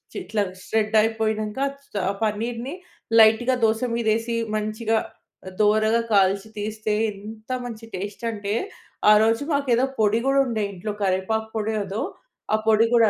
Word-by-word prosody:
చిట్లా 205 +3 -1 0.2
shred 220 0 0
అయిపోయినాంక. 220 0 -1 0.3
చ - - -16 0.2
ఆ - - -4
పన్నీర్‌ని 230 +5 -2 0.5
లైట్‌గా 225 +4 +5
దోస 220 +1 +1
మీద 235 -1 -1
ఏసి, 230 +1 -3 0.2
మంచిగా 215 +1 0 0.6
దోరగా 215 +2 +3
కాల్చి 195 +1 +3
తీస్తే. 215 0 -2 0.2
ఎంత 215 +3 -11 0.2
మంచి 225 -1 -7
టేస్ట్ 205 +5 -6
అంటే, 205 -1 -3 0.6
ఆ - - +9
రోజు 225 +4 +2
మాకేదో 265 -3 +2
పొడి 215 +1 +3
గూడా 275 0 +4
ఉండే 220 -3 -1
ఇంట్లో. 200 +3 -5
కరివేపాకు 200 +4 0
పొడి 220 0 -1
ఏదో 195 +3 -4 0.5
ఆ - - +6
పొడి 220 +1 +5
గూడా 230 -3 +5
220 Hz, 140 wpm, -24 LUFS, 210-230 Hz, 0.6 s, ఆ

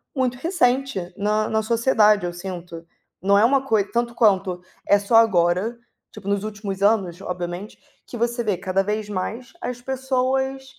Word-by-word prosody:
muito 255 -2 0
recente 265 - 0
na 215 +1 +1
na 220 0 +1
sociedade, 220 -3 +3
eu 175 - -3
sinto, 175 -2 -7 0.4
não 200 +2 +4
é 210 - +5
uma 270 +2 +3
coi 220 -6 +2
tanto 235 0 -1
quanto, 190 -5 +2 0.3
é 205 - +6
só 200 +3 0
agora, 195 0 +3 0.3
tipo 210 -2 -11
nos 200 0 0
últimos 205 -2 -5
anos, 195 -4 +2
obviamente, 180 +2 -5 0.3
que 240 - -8
você 235 +1 -1
vê, 205 -5 0
cada 190 +1 0
vez, 210 +1 -3
mais 220 +6 -4
as 250 -8 -5
pessoas, 265 +1 -1
215 Hz, 160 wpm, -22 LUFS, 190-245 Hz, 0.4 s, é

